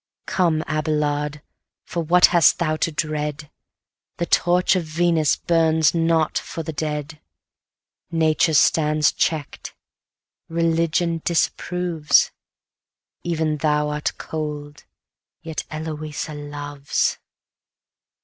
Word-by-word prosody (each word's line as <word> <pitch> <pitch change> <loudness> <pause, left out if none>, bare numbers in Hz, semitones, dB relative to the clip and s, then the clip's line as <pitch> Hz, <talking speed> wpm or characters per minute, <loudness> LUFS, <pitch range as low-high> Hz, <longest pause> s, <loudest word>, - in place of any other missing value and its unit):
Come, 165 -4 +1
Abelard! 150 -1 -1 0.4
for 170 - -3
what 175 +3 +5
hast 170 -2 +5
thou 155 -2 0
to 165 - -1
dread? 150 -1 -3 0.7
The 170 - -1
torch 180 +2 +3
of 180 - 0
Venus 160 -1 +1
burns 160 -2 +2
not 165 -2 +1
for 165 - -6
the 160 0 -5
dead. 150 0 -4 0.9
Nature 160 -1 +2
stands 150 0 +3
check'd; 155 -3 -2 0.8
Religion 165 0 0
disapproves; 170 -1 +1 0.9
Even 160 -3 -1
thou 150 0 +1
art 150 0 -3
cold 150 -2 -6 0.6
yet 160 -2 -5
Eloisa 155 -1 -5
loves. 145 -1 -3
155 Hz, 95 wpm, -22 LUFS, 150-165 Hz, 0.9 s, what